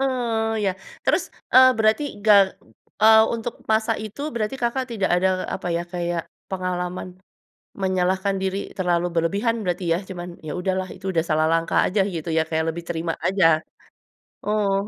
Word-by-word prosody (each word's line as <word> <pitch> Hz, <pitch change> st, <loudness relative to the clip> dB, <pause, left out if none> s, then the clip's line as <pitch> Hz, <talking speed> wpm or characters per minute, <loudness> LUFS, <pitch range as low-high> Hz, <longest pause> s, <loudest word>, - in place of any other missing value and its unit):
Eee, 235 Hz, -4 st, 0 dB
ya 190 Hz, -, +2 dB, 0.3 s
terus, -, -, +2 dB, 0.3 s
eee, 260 Hz, 0 st, +9 dB
berarti 220 Hz, +5 st, +3 dB, 0.2 s
ga 210 Hz, -1 st, +7 dB, 0.7 s
eee, 220 Hz, 0 st, +8 dB
untuk 230 Hz, +1 st, -4 dB, 0.2 s
masa 220 Hz, +1 st, +2 dB
itu 215 Hz, +6 st, -9 dB
berarti 220 Hz, +3 st, -2 dB
Kakak 255 Hz, +2 st, 0 dB
tidak 200 Hz, -4 st, -1 dB
ada 190 Hz, +1 st, +2 dB, 0.3 s
apa 180 Hz, -2 st, -4 dB
ya 170 Hz, -, -1 dB
kayak 175 Hz, -1 st, -2 dB, 0.3 s
pengalaman, 180 Hz, -1 st, -3 dB, 0.7 s
menyalahkan 190 Hz, +1 st, 0 dB
diri 190 Hz, 0 st, -1 dB, 0.2 s
terlalu 175 Hz, -2 st, +1 dB
berlebihan 200 Hz, +8 st, +1 dB
berarti 180 Hz, -1 st, -2 dB
ya? -, -, +1 dB
Cuman, 175 Hz, -1 st, -6 dB, 0.2 s
"Ya -, -, -3 dB
udahlah 185 Hz, 0 st, -1 dB
itu -, -, -13 dB
udah 165 Hz, -2 st, +1 dB
salah 155 Hz, 0 st, +2 dB
langkah 165 Hz, 0 st, +2 dB
aja." 200 Hz, +2 st, -1 dB
Gitu 165 Hz, 0 st, -4 dB
ya -, -, +5 dB
kayak 160 Hz, 0 st, 0 dB
lebih 170 Hz, +1 st, -7 dB
terima 165 Hz, 0 st, -2 dB
aja? 190 Hz, -2 st, +2 dB, 1.0 s
Oh. 210 Hz, -2 st, +1 dB
190 Hz, 155 wpm, -23 LUFS, 175-220 Hz, 1.0 s, eee